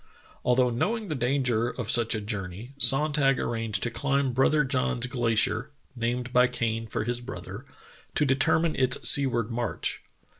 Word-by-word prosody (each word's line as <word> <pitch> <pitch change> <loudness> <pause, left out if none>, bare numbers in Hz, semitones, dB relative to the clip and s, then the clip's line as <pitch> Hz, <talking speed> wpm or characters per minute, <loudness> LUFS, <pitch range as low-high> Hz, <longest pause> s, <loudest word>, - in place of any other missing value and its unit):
Although 125 0 +3
knowing 210 - -1
the - - -1
danger 125 -3 0
of 125 -3 -3
such 115 -1 +2
a 110 - -3
journey, 105 +3 -6
Sonntag 140 -1 +3
arranged 115 -5 -2
to 120 - 0
climb 140 +1 0
Brother 150 +4 +3
John's 125 -2 -1
Glacier 120 0 0 0.3
(named 120 +1 -2
by 125 0 +5
Kane 115 -2 -2
for - - -3
his 120 +2 -2
brother) 120 -1 -8 0.5
to 150 - +2
determine 145 +4 +2
its 130 -1 +1
sea 140 -1 +6
ward 120 -2 -2
march. 120 0 -2
125 Hz, 155 wpm, -27 LUFS, 115-135 Hz, 0.5 s, sea